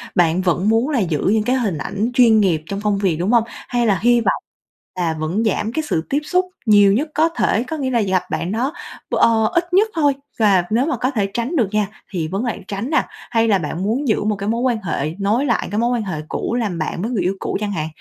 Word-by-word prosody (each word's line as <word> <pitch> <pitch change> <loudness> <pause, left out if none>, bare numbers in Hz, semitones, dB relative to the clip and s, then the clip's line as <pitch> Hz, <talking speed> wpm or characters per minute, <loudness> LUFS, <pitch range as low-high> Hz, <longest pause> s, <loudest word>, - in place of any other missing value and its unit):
Bạn 175 0 +3
vẫn 185 +2 +1
muốn 225 +5 +2
là 285 -5 +1
giữ 165 -7 0
những 220 -1 +2
cái 250 +4 +1
hình 215 -10 -1
ảnh 200 - -2
chuyên 235 -3 +5
nghiệp 180 -6 +2
trong 200 +3 -4
công 210 -1 +1
việc, 185 -6 +1
đúng 185 +6 0
hông? 235 -2 +4
Hay 240 0 -3
là 195 -4 +2
hy 240 0 +4
vọng - - 0 0.6
là 165 -2 0
vẫn 170 +8 -1
giảm 215 +1 0
cái 315 - -1
sự 160 - 0
tiếp 285 - +1
xúc 365 +4 +1 0.2
nhiều 205 -3 +6
nhất 290 +9 0
có 320 +2 +3
thể? 230 -8 +1
Có 315 +5 -5
nghĩa 265 -3 -2
là 235 -2 +2
gặp 190 -3 +1
bạn 175 - -2
đó 250 +7 -1 0.4
b - - +1
ờ, 225 -1 +4
ít 345 +1 0
nhất 415 +4 +4
thôi 290 -3 +3 0.3
và 200 -5 +4
nếu 235 +5 +2
mà 270 - -1
có 255 +4 0
thể 210 -7 0
tránh 240 +8 -2
được 235 - +2
nha 210 -1 +1 0.2
thì 170 -5 -2
vấn 195 +8 -2
lãng 230 -4 -4
tránh 200 +6 -4
nè, 300 -4 +2 0.3
hay 225 0 +2
là 205 -3 +4
bạn 165 +2 -4
muốn 245 +8 -1
giữ 215 - +1
một 210 0 0
cái 200 +1 -4
mối 230 +2 0
quan 245 -3 +1
hệ 160 -2 -2
nối 215 +7 +1
lại 240 -5 0
cái 210 - 0
mối 235 +1 +2
quan 240 -3 0
hệ 180 -7 -4
cũ 235 - -2
làm 215 -8 -1
bạn 155 +2 -3
với 225 +5 -2
người 210 -7 0
yêu 185 +2 0
cũ - - -2
chẳng 210 -1 -2
hạn? 155 -5 -2
215 Hz, 265 wpm, -19 LUFS, 190-245 Hz, 0.6 s, nhiều